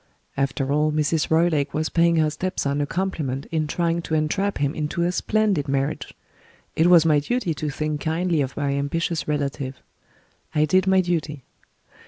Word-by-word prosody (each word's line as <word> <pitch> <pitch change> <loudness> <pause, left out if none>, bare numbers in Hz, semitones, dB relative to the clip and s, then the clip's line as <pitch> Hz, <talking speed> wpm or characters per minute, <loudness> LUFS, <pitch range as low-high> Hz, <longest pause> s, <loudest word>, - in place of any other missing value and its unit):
After 135 0 -1
all, 150 +1 +2
Mrs. 150 +1 0
Roylake 160 -3 +2
was 155 +1 0
paying 170 0 +3
her 155 -1 +2
step 185 +5 -3
son 140 +1 0
a 145 - -1
compliment 155 -8 -2
in 155 -2 0
trying 170 +1 0
to 160 - -2
entrap 175 +6 0
him 140 +1 0
into 155 +3 -2
a 175 - +1
splendid 205 -6 0
marriage. 135 +2 -2 0.6
It 160 - +3
was 175 -2 +6
my 155 -2 +4
duty 195 - -1
to 150 0 -3
think 150 +1 -3
kindly 165 0 0
of 130 -2 -4
my 145 -1 0
ambitious 155 +3 -2
relative. 140 -3 -3 0.8
I 150 0 +4
did 185 +5 +2
my 190 0 +5
duty. 155 -6 -2
155 Hz, 175 wpm, -23 LUFS, 145-170 Hz, 0.8 s, was